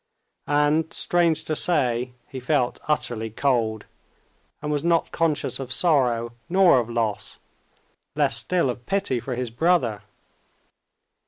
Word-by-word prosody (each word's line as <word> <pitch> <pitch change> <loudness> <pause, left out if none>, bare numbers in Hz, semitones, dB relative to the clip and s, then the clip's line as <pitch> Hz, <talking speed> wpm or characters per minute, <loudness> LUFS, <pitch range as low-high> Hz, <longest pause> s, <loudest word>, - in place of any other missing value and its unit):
And, 150 +2 +2
strange 170 -2 +2
to 155 - -2
say, 125 -8 +1
he 135 - -7
felt 125 -1 0
utterly 120 -7 -1
cold, 115 -3 0 0.7
and 150 0 -4
was 145 0 -1
not 170 -1 +1
conscious 165 -4 -1
of 130 -2 -6
sorrow 125 -8 +1 0.2
nor 185 -6 +5
of 120 -1 -3
loss, 115 -3 -2 0.8
less - - +2
still 175 -8 +1
of 120 0 -11
pity 195 -11 0
for 125 +1 -5
his 125 -1 -4
brother. 120 - +1
135 Hz, 130 wpm, -24 LUFS, 120-160 Hz, 0.8 s, nor